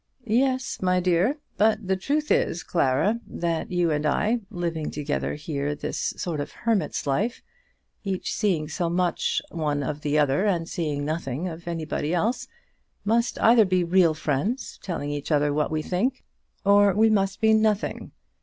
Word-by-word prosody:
"Yes, 255 +3 0
my 180 -1 +2
dear; 180 - +2 0.2
but 215 -1 +2
the 190 - +2
truth 295 +10 -1
is, 170 - +1
Clara, 175 - +1
that 170 0 -2
you 175 -2 +2
and 150 0 0
I, 210 +10 +1
living 170 -5 -3
together 145 0 -2
here 145 -1 -3
this - - -3
sort 165 -4 -3
of 145 +1 -4
hermit's 225 -9 -1
life, 200 - -1 0.6
each 195 -3 -2
seeing 180 -8 0
so 165 +3 -2
much 175 0 0
of 150 -2 -2
the 150 0 0
other 150 +7 +2
and 170 -4 0
seeing 150 -5 -2
nothing 155 0 -3
of 170 0 -8
anybody 160 -1 -2
else, 225 +8 0 0.6
must 230 +3 +1
either 230 0 +7
be 185 -2 +1
real 170 -2 +4
friends, 155 - -2
telling 155 -6 -3
each 145 +2 -4
other 145 -1 +2
what 150 0 0
we 155 -1 -2
think, 245 +11 -1 0.4
or 200 -1 +5
we 220 +1 +4
must 195 -1 +1
be 220 -1 +4
nothing. 215 -1 +1
175 Hz, 160 wpm, -25 LUFS, 150-210 Hz, 0.6 s, either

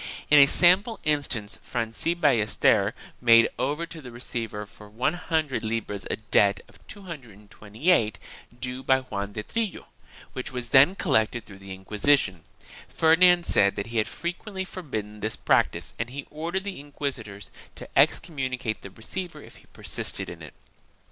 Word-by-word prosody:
In 150 - +9
a 140 - +9
sample 190 - +4
instance 135 -8 -1
Franci 115 +8 -2
Ballester 110 - +3 0.3
made 115 -1 +7
over 150 +5 -1
to 165 -1 -10
the 130 - -9
receiver 115 -3 -4
for 105 +1 -15
100 150 +1 -1
libras 110 -2 -3
a - - 0
debt 100 -2 +2
of - - -20
228 115 - -2 0.4
due 125 0 -4
by 130 0 +3
Juan 100 -5 -5
de 105 - -4
Trillo 225 - -3 0.5
which 130 - -5
was 125 -2 -4
then 140 +9 +6
collected 120 - +1
through 95 -2 -13
the 95 -1 -8
Inquisition. 100 - +1 0.4
Ferdinand 175 +2 +4
said 100 0 +3
that 100 - -3
he - - -1
had 110 - +1
frequently 190 +3 -5
forbidden 110 - -6
this 110 +1 -2
practice - - +1
and 115 +2 -2
he 140 +3 -7
ordered 170 +5 -3
the 200 -5 -6
inquisitors 130 -8 -6 0.2
to - - -10
excommunicate 130 -8 +1
the 100 - -9
receiver 150 - -7
if - - -14
he - - -20
persisted - - -4
in - - -11
it. - - -11
125 Hz, 150 wpm, -26 LUFS, 105-160 Hz, 0.5 s, In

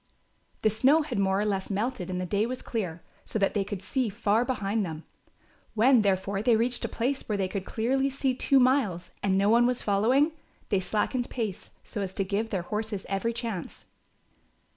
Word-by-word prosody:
The 215 - +4
snow 270 +9 +4
had 295 -9 -3
more 190 0 +2
or 210 - +1
less 195 -2 -1
melted 205 -2 -2
and 180 -1 -2
the 185 - -2
day 205 +4 0
was 255 +1 -5
clear, 180 -8 -4 0.2
so - - -3
that 195 -2 +1
they 205 - +1
could 195 -1 -6
see 255 +1 0
far 210 +2 +1
behind 220 -4 -1
them. 160 -3 -5 0.7
When, 240 +2 +5
therefore, 195 0 0
they 230 +1 +4
reached 240 +2 +1
a - - -1
place 260 +4 -1
where 210 - 0
they 190 -1 0
could 190 0 -4
clearly 265 +5 0
see 270 -1 0
two 270 +1 +3
miles 250 -10 +2
and 190 -1 +2
no 200 +1 +3
one 240 +2 +5
following, 245 +9 +2 0.4
they 200 - +2
slackened 220 +6 -1
pace, 220 -6 -4
so 205 - -5
as 190 -1 -4
to 195 - +1
give 205 +4 -2
their 190 -5 -2
horses 210 0 -3
every 195 +4 0
chance. 225 -7 -5
215 Hz, 195 wpm, -28 LUFS, 195-245 Hz, 0.7 s, When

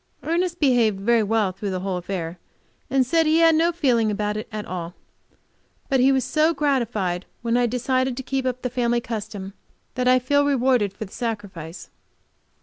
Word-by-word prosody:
Ernest 345 +2 -1
behaved 240 -8 +3
very 230 +3 +3
well 215 -2 +1
through 200 +2 -5
the 185 -1 -3
whole 190 -1 -2
affair, 175 -1 -5 0.5
and 265 0 +2
said 325 +5 +2
he 315 +1 +4
had 330 -1 +6
no 330 +2 +3
feeling 250 -10 +2
about 210 0 -1
it 215 - -5 0.2
all. 175 -1 -6 0.9
But 270 -2 +2
he 260 +2 +5
was 265 -1 +2
so 315 +1 +2
gratified 225 -11 -1 0.2
when 230 0 +1
I 245 0 +3
decided 255 +1 0
to 265 - -4
keep 265 0 -2
up 255 0 -3
the 250 - -2
family 240 -1 +1
custom 215 -4 -6 0.4
that 250 -1 -1
I 255 0 +6
feel 285 +3 +2
rewarded 255 -7 +2
for 215 - -7
the 190 - -15
sacrifice. 190 -8 -6
240 Hz, 180 wpm, -23 LUFS, 205-265 Hz, 0.9 s, had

